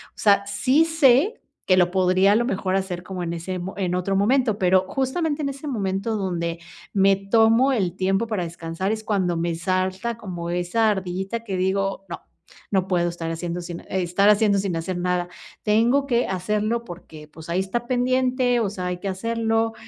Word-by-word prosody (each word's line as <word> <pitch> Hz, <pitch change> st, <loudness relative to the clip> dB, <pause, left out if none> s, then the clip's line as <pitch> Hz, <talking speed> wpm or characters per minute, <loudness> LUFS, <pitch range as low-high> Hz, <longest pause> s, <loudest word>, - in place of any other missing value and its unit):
O -, -, -45 dB
sea, 200 Hz, -1 st, +4 dB
sí 265 Hz, +9 st, +2 dB
sé, 320 Hz, -, +3 dB, 0.2 s
que 185 Hz, -, +4 dB
lo 175 Hz, -1 st, +4 dB
podría 185 Hz, +1 st, +3 dB
a -, -, +4 dB
lo 235 Hz, +2 st, +2 dB
mejor 190 Hz, -5 st, -1 dB
hacer 190 Hz, -2 st, -2 dB
como 185 Hz, -1 st, -6 dB
en 170 Hz, 0 st, -3 dB
ese 175 Hz, +2 st, -4 dB
mo 185 Hz, +2 st, -5 dB
en 180 Hz, -2 st, -1 dB
otro 185 Hz, +2 st, -1 dB
momento, 225 Hz, +2 st, +2 dB
pero, 185 Hz, 0 st, +3 dB
justamente 290 Hz, +3 st, -1 dB
en 280 Hz, -, 0 dB
ese 275 Hz, +2 st, -7 dB
momento 205 Hz, -3 st, -2 dB
donde 170 Hz, -4 st, -2 dB, 0.3 s
me 195 Hz, 0 st, +4 dB
tomo 225 Hz, +6 st, +3 dB
el 185 Hz, -7 st, -1 dB
tiempo 195 Hz, +4 st, 0 dB
para 210 Hz, -5 st, -2 dB
descansar 165 Hz, +3 st, -4 dB
es 220 Hz, 0 st, -3 dB
cuando 185 Hz, -6 st, 0 dB
me 170 Hz, 0 st, -1 dB
salta 185 Hz, +6 st, -1 dB
como 175 Hz, -6 st, -6 dB
esa 180 Hz, +6 st, +1 dB
ardillita 190 Hz, +4 st, -3 dB
que 195 Hz, -4 st, -3 dB
digo: 195 Hz, +1 st, -1 dB
"No, 170 Hz, -, -6 dB, 0.5 s
no 190 Hz, -1 st, +1 dB
puedo 175 Hz, -2 st, +1 dB
estar 170 Hz, -1 st, -5 dB
haciendo 175 Hz, +1 st, -4 dB
sin 170 Hz, 0 st, -7 dB
e 190 Hz, -, -3 dB
estar 190 Hz, +4 st, +3 dB
haciendo 210 Hz, -1 st, +4 dB
sin 190 Hz, -3 st, -2 dB
hacer 165 Hz, +2 st, -3 dB
nada", 180 Hz, 0 st, -1 dB, 0.4 s
tengo 235 Hz, +6 st, +3 dB
que 240 Hz, -2 st, +1 dB
hacerlo 210 Hz, +5 st, -1 dB
porque, 160 Hz, -4 st, -11 dB
pues, 160 Hz, +2 st, -13 dB
ahí 175 Hz, +2 st, 0 dB
está 235 Hz, +6 st, -2 dB
pendiente, 255 Hz, 0 st, +1 dB
o 215 Hz, -, 0 dB
sea, 185 Hz, -2 st, -5 dB
hay 180 Hz, -, -2 dB
que 200 Hz, -, -5 dB
hacerlo. 225 Hz, +2 st, 0 dB
195 Hz, 195 wpm, -23 LUFS, 180-230 Hz, 0.5 s, sea